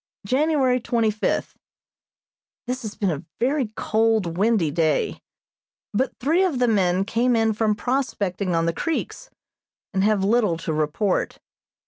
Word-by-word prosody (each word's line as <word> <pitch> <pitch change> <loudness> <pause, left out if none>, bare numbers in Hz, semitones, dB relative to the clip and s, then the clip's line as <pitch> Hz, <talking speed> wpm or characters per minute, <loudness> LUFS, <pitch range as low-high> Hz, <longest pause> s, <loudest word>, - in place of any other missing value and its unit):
January 265 +1 +2
twenty 230 -2 +1
fifth: 210 - -2 1.1
This 255 +1 -3
has 215 -3 -6
been 195 -4 0
a 150 0 -4 0.2
very 265 +1 +1
cold, 220 -7 +1
windy 200 -5 +2
day, 160 -2 0 0.7
but 255 +6 -1
three 325 +8 +2
of 350 -8 0
the 245 0 +2
men 190 -3 +2
came 240 +3 +1
in 225 -1 +2
from 215 0 +1
prospecting 205 -7 -1
on 165 0 +1
the 170 - 0
creeks, 330 - -3 0.6
and 190 0 +1
have 210 -2 +2
little 210 -4 +2
to 160 -1 -3
report. 155 +6 0
220 Hz, 140 wpm, -23 LUFS, 185-250 Hz, 1.1 s, January